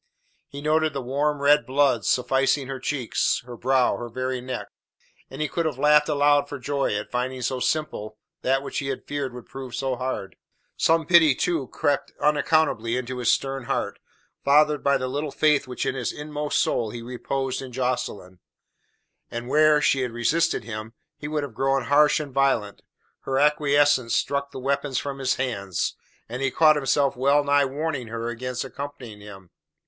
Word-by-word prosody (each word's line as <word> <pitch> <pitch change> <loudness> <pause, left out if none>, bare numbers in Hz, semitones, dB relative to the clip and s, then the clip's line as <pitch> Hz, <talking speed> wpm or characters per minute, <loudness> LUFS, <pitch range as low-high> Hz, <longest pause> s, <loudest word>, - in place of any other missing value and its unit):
He 140 - -9
noted 155 0 +2
the 135 - -3
warm, 140 +3 -1
red 145 +1 +5
blood 130 -4 +2
suffusing 135 +2 +2
her 135 0 -5
cheeks, 130 -4 -1
her 125 -1 -8
brow, 130 +2 +2
her 120 - -6
very 130 +1 -3
neck; 125 0 -5 0.6
and 135 +3 -4
he - - 0
could 170 +1 -1
have 150 - -4
laughed 150 +2 +4
aloud 145 -1 +3
for 145 - -5
joy 140 -4 -1
at 105 - -4
finding 125 +1 -2
so 130 +2 -1
simple 110 -8 -2 0.2
that 135 +1 +1
which - - -3
he 140 - -4
had 135 -1 -4
feared 145 -3 -3
would 125 -1 -10
prove 130 -3 -8
so 130 +1 -1
hard. 125 -6 -4 0.4
Some 165 0 +2
pity, 160 -4 +6
too, 160 -5 -1
crept 145 +2 -1
unaccountably 150 -6 +2
into 130 0 -4
his 120 - +3
stern 135 -2 -1
heart, - - -2 0.4
fathered 150 +1 +4
by 140 0 +3
the 130 - -3
little 145 +3 -3
faith 145 0 +2
which 125 - -4
in - - 0
his 125 -3 -2
inmost 150 0 -3
soul 115 - 0
he 115 +2 -7
reposed 130 +2 -3
in 130 -1 -8
Jocelyn. 120 -7 -3 0.9
And 120 +1 -6
where, 155 +1 +5
had 150 - +1
she 135 -1 +3
resisted 135 +8 0
him, 110 0 -7 0.2
he 145 - -7
would 150 -1 -2
have 140 -5 -6
grown 135 +2 +1
harsh 145 +4 +4
and 145 -3 -6
violent, 130 -7 +1 0.4
her 135 - -2
acquiescence 145 -4 +3
struck 140 0 -1
the - - -10
weapons 140 0 -1
from 140 +1 -4
his 130 -1 +1
hands, 100 -8 -2 0.3
and 120 +3 -6
he 135 - +1
caught 155 +3 +5
himself 140 -1 +1
well 140 +3 +3
nigh 145 0 +3
warning 140 -2 -3
her 115 +1 -4
against 125 +1 -4
accompanying 130 -6 -8
him. 95 -3 -12
135 Hz, 180 wpm, -24 LUFS, 125-145 Hz, 0.9 s, pity